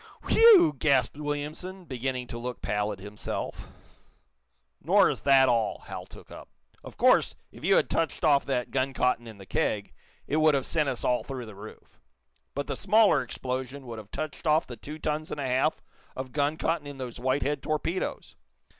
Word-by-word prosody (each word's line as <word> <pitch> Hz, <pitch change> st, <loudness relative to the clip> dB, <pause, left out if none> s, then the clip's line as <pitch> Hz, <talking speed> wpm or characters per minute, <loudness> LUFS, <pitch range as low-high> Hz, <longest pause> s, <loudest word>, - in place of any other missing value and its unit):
"Whew!" 445 Hz, -, +7 dB
gasped 135 Hz, -5 st, +2 dB
Williamson, 150 Hz, +6 st, -5 dB
beginning 130 Hz, -2 st, -3 dB
to 115 Hz, -, -6 dB
look 125 Hz, +1 st, -6 dB
pallid 105 Hz, 0 st, -1 dB
himself. 100 Hz, +2 st, -6 dB, 1.1 s
"Nor -, -, +4 dB
is -, -, -6 dB
that 135 Hz, -1 st, +5 dB
all," 115 Hz, -3 st, 0 dB
Hal -, -, -7 dB
took -, -, -15 dB
up. -, -, -11 dB, 0.3 s
"Of -, -, -11 dB
course, -, -, +4 dB, 0.2 s
if 120 Hz, -, -14 dB
you 195 Hz, +3 st, +4 dB
had -, -, +3 dB
touched 165 Hz, +1 st, -1 dB
off 145 Hz, -2 st, +5 dB
that 125 Hz, -3 st, -1 dB
gun 135 Hz, 0 st, 0 dB
cotton 125 Hz, -2 st, +1 dB
in 110 Hz, -2 st, -10 dB
the 95 Hz, -, -12 dB
keg, 100 Hz, +2 st, -1 dB, 0.3 s
it 150 Hz, -, -1 dB
would 155 Hz, -1 st, +4 dB
have 135 Hz, -, 0 dB
sent 155 Hz, -4 st, +1 dB
us 130 Hz, -, -4 dB
all 125 Hz, -1 st, +1 dB
through 130 Hz, -3 st, -6 dB
the 110 Hz, -, -10 dB
roof. 105 Hz, +2 st, -13 dB, 0.6 s
But 140 Hz, -, -2 dB
the -, -, -3 dB
smaller 205 Hz, -6 st, +4 dB
explosion 130 Hz, +2 st, -5 dB
would 115 Hz, -2 st, -7 dB
have 105 Hz, -1 st, -12 dB
touched 155 Hz, +4 st, -5 dB
off 155 Hz, +2 st, +4 dB
the 120 Hz, -, -8 dB
two 150 Hz, +5 st, -9 dB
tons 155 Hz, 0 st, -2 dB
and -, -, -5 dB
a 140 Hz, -, -2 dB
half 130 Hz, +5 st, +1 dB, 0.3 s
of 130 Hz, -1 st, -6 dB
gun 145 Hz, +2 st, 0 dB
cotton 160 Hz, -3 st, -1 dB
in 145 Hz, -1 st, -8 dB
those 125 Hz, -2 st, -6 dB
Whitehead 135 Hz, +3 st, 0 dB
torpedoes. 160 Hz, +5 st, -3 dB
135 Hz, 185 wpm, -28 LUFS, 125-155 Hz, 1.1 s, Whew